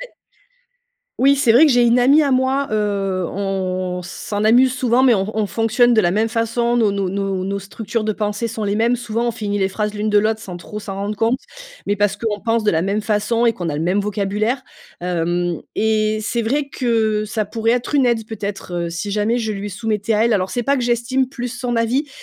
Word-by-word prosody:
Mais - - -10 1.0
Oui, 275 +2 +5
c'est 245 -4 +3
vrai 250 +7 +7
que 300 - +4
j'ai 245 -1 +4
une 240 +1 +4
amie 285 +5 +5
à 275 - +1
moi, 260 +2 +1
heu, 200 -3 -1
on 185 -2 -2
s'en 205 +3 -5
amuse 245 +4 +5
souvent, 255 0 +2
mais 250 -3 +6
on 195 +1 -1
on 210 - +1
fonctionne 225 +5 +2
de 220 - +5
la 175 - +2
même 215 +4 +1
façon 235 +1 0
dans 225 -3 +3
nos 200 -2 -1
nos 195 -1 -2
nos 200 +1 -2
structures 215 +3 -4
de 215 - -1
pensées 210 +2 -2
sont 220 -1 -4
les 200 0 0
mêmes. 235 +3 +2
Souvent, 235 0 -2
on - - +2
finit 205 -3 -3
les 190 - +2
phrases 210 +1 -3
l'une 210 +1 -1
de 210 - +5
l'autre 220 +1 +1
sans 180 -4 -7
trop 210 +4 -8
s'en 195 -1 -6
rendre 200 +2 -3
compte. 230 +4 +1 0.5
Mais 205 - +1
parce 205 0 +1
qu'on 210 -1 -3
pense 225 0 0
de 210 - +3
la 160 +1 +1
même 200 +2 0
façon 215 +2 0
et 230 - +4
qu'on 175 -6 -5
a 145 - -2
le 155 - -2
même 185 +4 +1
vocabulaire. 210 +4 -1 0.4
Hem 175 -1 -1 0.2
et 215 0 +1
c'est 235 +2 -1
vrai 280 +5 -1
que 220 -5 0
ça 215 0 -2
pourrait 225 +2 -1
être 245 +4 -1
une 270 -3 +4
aide, 225 -2 0
peut-être, 195 -5 -4
heu, - - -5
si 185 +4 -4
jamais 215 +3 +1
je 220 -2 -2
lui 205 0 -5
soumettais 215 +2 -1
à 215 +2 +3
elle. 235 - +2
Alors, 190 -2 0
c'est 245 -1 -2
pas 280 +3 +2
que 255 - -1
j'estime 240 +2 0
plus 250 -2 -5
son 245 0 -3
avis, 250 +6 0
215 Hz, 235 wpm, -19 LUFS, 200-235 Hz, 1.0 s, vrai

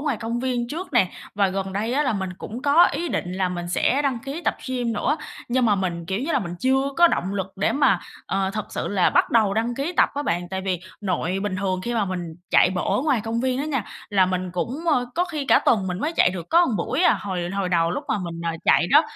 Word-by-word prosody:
ngoài 290 -5 0
công 230 +2 -3
viên 245 -2 -1
trước 335 +6 -6
nè, 195 -8 +3 0.2
và 200 -1 +2
gần 190 0 -3
đây 215 +5 -1
á 285 +3 +2
là 260 - +1
mình 190 -3 -3
cũng 235 +4 -7
có 295 +4 +6
ý 345 - -2
định 180 - -2
là 185 0 0
mình 175 -1 -4
sẽ 260 +10 +1
đăng 270 -4 0
ký 275 +7 -6
tập - - +1
gym 245 -2 -1
nữa, 265 +7 0 0.3
nhưng 250 +1 +2
mà 210 - +4
mình, 175 -4 -3
kiểu 190 +4 -2
như 305 +6 -2
là, - - +3
mình 175 -3 -5
chưa 265 +3 +2
có 345 0 +7
động 195 - -1
lực 190 -2 -1
để 195 - +1
mà, 220 -10 +3 0.3
ờ, 195 0 0
thật 215 0 -4
sự - - -3
là 195 -3 +2
bắt - - +3
đầu 215 -4 +3
đăng 230 +3 0
ký 280 +7 -2
tập - - +5
á 285 - -2
bạn. 175 -7 -1
Tại 190 +1 -3
vì 185 -2 -2 0.2
nội 185 -1 -1
bình 205 -3 -2
thường 185 -1 -1
khi 240 +3 -2
mà 220 -3 +2
mình 185 -2 -3 0.3
chạy - - +5
bộ 190 +2 0
ở 250 - 0
ngoài 280 -6 +2
công 230 +1 -1
viên 255 0 0
á 280 - -1
nha, 270 -8 -1 0.2
là 195 -3 +3
mình 185 0 -2
cũng, 240 - -3
ơ, 245 -3 +1
có 350 - +2
khi 310 -5 -4
cả - - +5
tuần 200 -5 +2
mình 180 -1 -3
mới 310 +6 -1
chạy - - +5
được 175 -3 -6
có 340 +1 +5
buổi 265 +7 -1
à. - - +5
Hồi 185 -4 -3
hồi 195 -1 -1
đầu, 170 -2 +2
lúc 180 - -3
mà - - +1
mình, 170 -3 -5
ờ, 170 - +1
chạy - - +4
đó, 295 - +7
210 Hz, 270 wpm, -23 LUFS, 185-265 Hz, 0.3 s, có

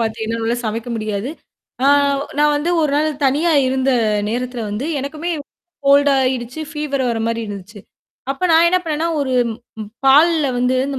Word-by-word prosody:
பாத்திங்கன்னா 225 0 -2
என்னால்ல 230 +1 -1
சமைக்க 225 +2 -4
முடியாது. 215 +3 -3 0.5
ஆ - - +4 0.5
நான் 295 0 +4
வந்து 320 +4 -1
ஒரு 295 - +1
நாள் 310 +1 +2 0.2
தனியா 310 +5 +2
இருந்த 260 +1 +1 0.4
நேரத்தல 250 0 -3
வந்து 215 +8 -3
எனக்குமே 305 +5 -4 0.6
கோல்டா 280 0 +5
ஆயிடுச்சு. 255 +3 -3
ஃபீவர் 295 -4 -2
வர 225 -1 -2
மாரி 230 0 -1
இருந்துச்சு. 205 +1 -9 0.5
அப்ப 275 - -4
நான் 330 +1 +6
என்ன 365 +1 +3
பண்ணேன்னா, 320 0 -2
ஒரு 260 -2 -1 0.7
பால்ல 305 +2 +5
வந்து 250 +1 +1
இந்த 275 -2 -3
265 Hz, 155 wpm, -19 LUFS, 230-300 Hz, 0.7 s, நான்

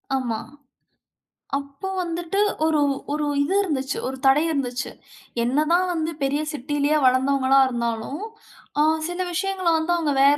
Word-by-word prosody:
ஆமா. 240 -4 -1 1.2
அப்போ 280 +6 -6
வந்துட்டு 345 +3 -2 0.3
ஒரு 315 -2 +2 0.3
ஒரு 300 0 -1 0.2
இது 295 +7 0
இருந்துச்சு. 275 -7 -2
ஒரு 265 0 -4
தடை 270 +2 +6
இருந்துச்சு. 265 -4 -2 0.5
என்னதான் 305 +8 +2
வந்து 320 0 -1
பெரிய 280 +2 +1
சிட்டியிலேயே 290 +2 0
வளர்ந்தவங்களா 265 +1 +4
இருந்தாலும். 235 - -3 0.6
அ - - +6 0.2
சில 350 +1 -3
விஷயங்கள 380 0 -1
வந்து 320 +2 -1
அவங்க 320 -4 0
வேற 285 +1 +6
290 Hz, 125 wpm, -23 LUFS, 265-330 Hz, 1.2 s, தடை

